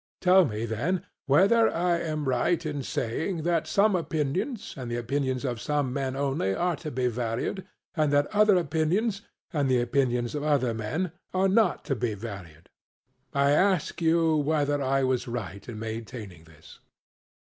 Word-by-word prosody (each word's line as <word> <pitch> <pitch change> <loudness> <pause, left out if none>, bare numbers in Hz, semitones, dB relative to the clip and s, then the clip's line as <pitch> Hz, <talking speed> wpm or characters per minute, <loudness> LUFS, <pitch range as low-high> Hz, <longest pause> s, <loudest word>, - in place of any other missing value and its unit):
Tell 185 0 +5
me 110 -3 -3
then, 140 - -1 0.2
whether 200 +11 +5
I 170 0 +1
am 155 -3 -3
right 160 +7 +1
in 145 -2 -3
saying 155 - -2
that 165 -2 +1
some 205 +2 +3
opinions, 180 - -2
and 130 -5 -6
the 120 - -2
opinions 130 +2 -1
of 120 -3 -3
some 145 -4 -1
men 135 -1 -2
only, 135 -8 0
are 175 -1 0
to 160 - -6
be 130 -2 -2
valued, 120 - -2 0.3
and 155 -3 +2
that 145 0 +3
other 210 -1 +5
opinions, 180 +7 0 0.3
and 145 -4 +1
the 130 -1 +3
opinions 120 -1 0
of 150 - -2
other 140 -5 +1
men, 150 +12 -2 0.2
are 190 +1 +3
not 195 -3 +2
to 140 -2 0
be 115 -2 -2
valued. 95 -7 -9 0.6
I 140 0 +2
ask 185 +2 +2
you 165 -1 +3
whether 145 -1 +1
I 135 0 +1
was 130 -1 0
right 100 -4 -6
in 115 - -6
maintaining 110 -5 -7
this? 80 -1 -17
140 Hz, 165 wpm, -27 LUFS, 120-170 Hz, 0.6 s, Tell